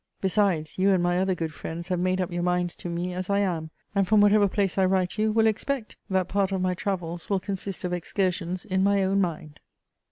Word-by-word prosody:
Besides, 190 -5 0
you 195 +1 +4
and 185 -3 +3
my 175 0 +2
other 190 0 +1
good 165 -2 -4
friends 170 +4 -6
have 180 -1 0
made 185 +1 +1
up 180 -1 -1
your 175 0 -2
minds 180 0 0
to 175 - -6
me 175 +1 -3
as 185 +1 -4
I 200 - +2
am, 175 -6 -1 0.2
and 195 -2 +2
from 215 +1 +5
whatever 205 0 +5
place 195 -1 0
I 190 - +5
write 185 +2 0
you 215 0 +2
will 225 +1 +3
expect 225 +2 -1
that 190 -2 +1
part 200 0 0
of 190 - 0
my 185 0 +1
"Travels" 175 -3 -4
will 200 -2 +2
consist 195 0 -5
of 180 -1 -2
excursions 180 0 -2
in 190 0 +1
my 200 0 +3
own 195 +1 +2
mind. 155 -4 -4
185 Hz, 230 wpm, -26 LUFS, 175-200 Hz, 0.2 s, from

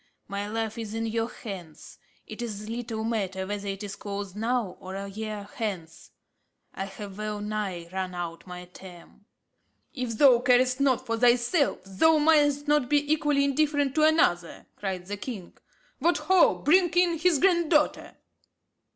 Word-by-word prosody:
"My 200 +1 -4
life 225 +1 -3
is 220 -1 -5
in 225 0 -2
your 225 +1 -1
hands. 185 -11 -10 0.3
It 215 +2 -8
is 215 -3 -5
little 230 -1 -4
matter 195 -5 -2
whether 205 +1 -5
it 195 +1 -4
is 200 -1 -6
closed 200 -2 -6
now 225 -3 -1
or 185 +1 -8
a 200 0 -5
year 210 0 -6
hence. 190 -8 -5 0.6
I 195 - -4
have 200 0 -9
well 215 -1 -3
nigh 205 -5 -4
run 185 -1 -3
out 170 0 -6
my 180 0 -8
term." 180 +2 -14 0.7
"If 250 -4 -4
thou 260 -3 +6
carest 255 +1 +3
not 270 -3 +2
for 230 0 -1
thyself, 245 +6 +2
thou 310 +12 +3
mayest 295 -1 +3
not 295 -4 +2
be 295 +1 +2
equally 295 -2 +1
indifferent 285 -1 +1
to 310 - +1
another," 300 - +2
cried 190 -3 -4
the 205 +2 -5
king. 200 -5 -7 0.4
"What 345 +1 +2
ho! 375 -1 +4
bring 350 +5 +3
in 350 -2 +3
his 340 -1 +3
granddaughter." 340 -3 +2
225 Hz, 160 wpm, -27 LUFS, 195-285 Hz, 0.7 s, thou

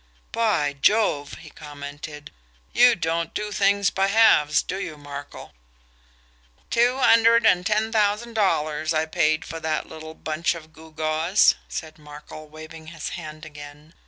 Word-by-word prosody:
"By 205 -11 0
Jove!" 145 -2 +1
he 155 -2 -13
commented. 145 0 -10 0.4
"You 245 -1 +6
don't 165 -1 -2
do 210 0 -3
things 200 0 +2
by 195 0 +1
halves, 200 -8 +4
do 190 - -5
you, 155 -6 -6
Markel?" 145 -1 -10 1.2
"Two 245 +2 +2
hundred 230 -2 +5
and 180 -3 +4
ten 215 +3 0
thousand 215 +2 0
dollars 155 -6 0
I 155 +1 +1
paid 155 0 0
for 165 - -7
that 160 -1 -2
little 160 0 -10
bunch 160 +2 -2
of 160 -1 -12
gewgaws," 160 +3 +1 0.2
said 160 -1 -7
Markel, 150 +1 -12
waving 155 +1 -12
his 165 -1 -6
hand 155 -2 -8
again. 145 +1 -12
160 Hz, 140 wpm, -23 LUFS, 155-200 Hz, 1.2 s, You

